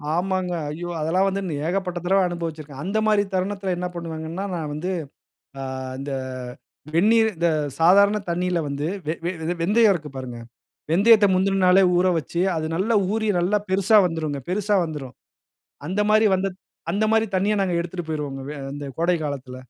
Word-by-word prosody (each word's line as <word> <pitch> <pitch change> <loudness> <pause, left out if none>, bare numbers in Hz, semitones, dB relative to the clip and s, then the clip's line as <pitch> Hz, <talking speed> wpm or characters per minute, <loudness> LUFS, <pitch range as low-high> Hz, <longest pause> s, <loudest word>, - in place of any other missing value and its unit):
ஆமாங்க. 185 0 -1 0.2
ஐயோ! 175 +3 -5
அதெல்லாம் 180 +5 +2
வந்து 195 +1 -1
இன்னும் 150 -5 -3
ஏகப்பட்ட 180 -1 -2
தடவ 195 +2 +3
அனுபவிச்சுருக்கேன். 155 -5 -6
அந்த 200 +4 -1
மாரி 210 -1 +4
தருணத்தில, 190 0 -1
என்ன 180 0 -2
பண்ணுவேங்கன்னா, 165 +2 -5
நான் 155 -3 -4
வந்து, 175 +5 -3 0.7
ஆ - - -5 0.4
இந்த 140 0 -5 0.8
வெந்நீர் 220 +5 +4
இந்த 170 0 +2 0.3
சாதாரண 200 +5 +6
தண்ணீல 180 0 0
வந்து, 140 +2 -3 0.2
வெ 160 - 0
வெ 175 - 0 0.2
வெ 175 - 0
வெந்தயம் 210 +3 +4
இருக்கு 150 -4 -6
பாருங்க. 125 -2 -6 0.5
வெந்தயத்த 205 +4 +6
முந்தின 195 +1 +1
நாளே 190 +2 +6
ஊற 180 +1 +3
வச்சு, 170 +3 -3 0.2
அது 155 0 -2
நல்லா 220 +5 +1 0.2
ஊறி, 220 -1 0
நல்லா 190 +4 +2
பெருசா 195 +3 +3
வந்துருங்க, 155 -4 -3
பெருசா 205 +2 0
வந்துரும். 145 -5 -6 0.7
அந்த 195 +3 -1
மாரி 215 0 +5
வந்த 195 +1 -1 0.4
அந்த 210 +2 +1
மாரி 225 0 +3
தண்ணிய, 200 +3 +2
நாங்க 185 -2 0
எடுத்துட்டு 175 0 -4
போயிருவோங்க, 145 -3 -4
வே 150 - -5 0.2
அந்த 145 0 -6
கோடை 175 +1 +2
காலத்தில. 135 -3 -5
180 Hz, 165 wpm, -23 LUFS, 160-195 Hz, 0.8 s, சாதாரண